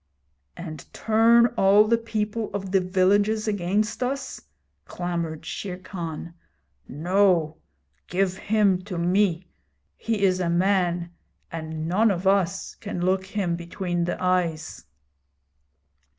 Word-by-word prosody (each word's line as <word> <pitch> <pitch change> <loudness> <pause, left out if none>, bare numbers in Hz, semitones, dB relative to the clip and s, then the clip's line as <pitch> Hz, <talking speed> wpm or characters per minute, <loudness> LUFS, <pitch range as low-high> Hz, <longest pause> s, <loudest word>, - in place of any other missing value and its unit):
'And 155 -4 -8
turn 230 +2 +5
all 205 +1 +5
the 230 - +4
people 220 -1 -3
of 195 -2 -4
the 190 -1 +3
villages 200 +4 +2
against 205 +3 -1
us?' 265 +1 -3 0.4
clamoured 170 -3 -4
Shere 185 -3 -5
Khan. 170 -3 -7 0.5
'No; 170 0 +1 0.5
give 185 0 0
him 200 -2 +2
to 190 -4 -5
me. 180 0 +1 0.5
He 220 -3 -2
is 185 -1 +3
a 175 -2 0
man, 175 -1 +1 0.4
and 160 -1 -5
none 210 +6 +3
of 185 -1 -2
us 190 -1 +1
can 205 -4 -6
look 190 +1 0
him 195 -4 -1
between 175 0 -3
the 175 - -2
eyes.' 175 -4 -1
185 Hz, 120 wpm, -25 LUFS, 175-205 Hz, 0.5 s, turn